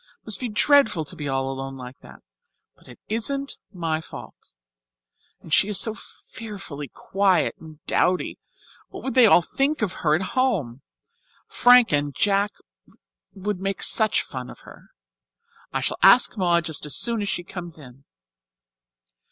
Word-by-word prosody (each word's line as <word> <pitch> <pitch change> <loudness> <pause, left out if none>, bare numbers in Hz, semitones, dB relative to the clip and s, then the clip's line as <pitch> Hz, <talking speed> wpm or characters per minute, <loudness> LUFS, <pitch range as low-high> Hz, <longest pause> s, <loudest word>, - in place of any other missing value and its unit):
It - - -46
must 215 -3 0
be 250 - -4
dreadful 220 - +3
to - - -6
be 145 - -6
all 135 0 -1
alone 135 0 -6
like 125 0 -10
that. - - -16 0.5
But - - -24
it - - -13
isn't 275 +6 -2
my 165 -4 -3
fault. - - -12 0.9
And 160 - -7
she 195 - +5
is 210 -2 +3
so 220 - +3
fearfully 195 -10 -9
quiet 195 0 0
and 155 -1 -15
dowdy 180 0 0 0.5
what - - -10
would 265 - -3
they 255 -3 +6
all 175 - +5
think 275 - -1
of 190 -3 -1
her 155 -2 +3
at 175 - -1
home? 180 - -1 0.6
Frank 245 -1 +5
and 145 -1 0
Jack 200 0 +1 0.8
would 195 0 -4
make 195 0 -2
such 220 -2 +4
fun 130 -1 -8
of - - -13
her. - - -16 0.8
I - - -2
shall - - -2
ask 245 - +6
Maud 175 -4 +1
just 160 -3 -4
as 145 - +1
soon 230 -2 0
as 200 - -2
she 175 - -2
comes 175 -2 -9
in." 135 -2 -15
185 Hz, 160 wpm, -23 LUFS, 150-220 Hz, 0.9 s, they